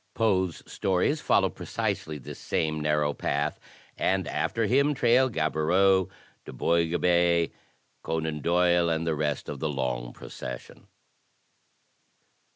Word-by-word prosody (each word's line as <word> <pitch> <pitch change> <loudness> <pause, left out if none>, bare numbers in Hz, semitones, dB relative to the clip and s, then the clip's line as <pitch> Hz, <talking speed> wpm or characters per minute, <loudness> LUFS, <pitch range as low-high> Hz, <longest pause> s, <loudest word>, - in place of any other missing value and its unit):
Poe's 95 -7 +1
stories 95 - 0
follow - - +3
precisely 75 -1 -3
this 70 - -9
same 80 -1 -1
narrow 75 -1 +1
path, 75 +2 -2 0.4
and 95 -3 0
after 115 -1 -1
him 140 +6 +3
trail 125 +1 +4
Gaboriau, 95 +1 +2 0.4
Du - - -9
Boisgobey, 85 0 +2 0.5
Conan 80 -2 -3
Doyle 85 +1 +3
and 80 0 -1
the 80 - +1
rest 75 -2 -2
of 70 - -5
the 80 - -1
long 65 -4 -2
procession. 60 0 -9
85 Hz, 115 wpm, -27 LUFS, 75-95 Hz, 0.5 s, trail